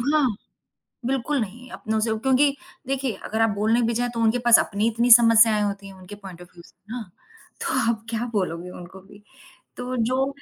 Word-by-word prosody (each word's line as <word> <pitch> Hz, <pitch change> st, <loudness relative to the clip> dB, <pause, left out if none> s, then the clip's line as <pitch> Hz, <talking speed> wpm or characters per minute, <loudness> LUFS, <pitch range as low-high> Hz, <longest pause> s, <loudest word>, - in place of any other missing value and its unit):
हाँ। 290 Hz, +3 st, +2 dB, 0.8 s
बिल्कुल 270 Hz, +2 st, -1 dB
नहीं, 235 Hz, +4 st, -7 dB
अपनों 220 Hz, 0 st, -3 dB
से 220 Hz, +1 st, -1 dB
क्योंकि 275 Hz, +2 st, +2 dB, 0.3 s
देखिए 265 Hz, -2 st, -2 dB, 0.2 s
अगर 220 Hz, -, -2 dB
आप 225 Hz, -, +3 dB
बोलने 220 Hz, +4 st, +1 dB
भी 230 Hz, 0 st, 0 dB
जाएँ 245 Hz, 0 st, -1 dB
तो 230 Hz, -, -3 dB
उनके 225 Hz, +2 st, +2 dB
पास 240 Hz, -1 st, +7 dB
अपनी 205 Hz, +2 st, -1 dB
इतनी 235 Hz, +2 st, 0 dB
समस्यायें 230 Hz, -2 st, +6 dB
होती 200 Hz, -1 st, -3 dB
हैं 195 Hz, -, -11 dB
उनके 185 Hz, +1 st, -12 dB
पॉइंट 190 Hz, -4 st, -12 dB
ऑफ़ 175 Hz, -, -14 dB
व्यू 170 Hz, -1 st, -15 dB
से -, -, -23 dB, 0.2 s
ना। 245 Hz, -1 st, -4 dB, 0.6 s
तो -, -, -2 dB, 0.2 s
आप 225 Hz, -1 st, -4 dB
क्या 230 Hz, +1 st, -2 dB
बोलोगे 180 Hz, -4 st, -3 dB
उनको 180 Hz, +1 st, -11 dB
भी। 200 Hz, +2 st, -18 dB, 0.5 s
तो 250 Hz, +1 st, -5 dB
जो 255 Hz, +3 st, 0 dB
225 Hz, 195 wpm, -23 LUFS, 200-245 Hz, 0.8 s, पास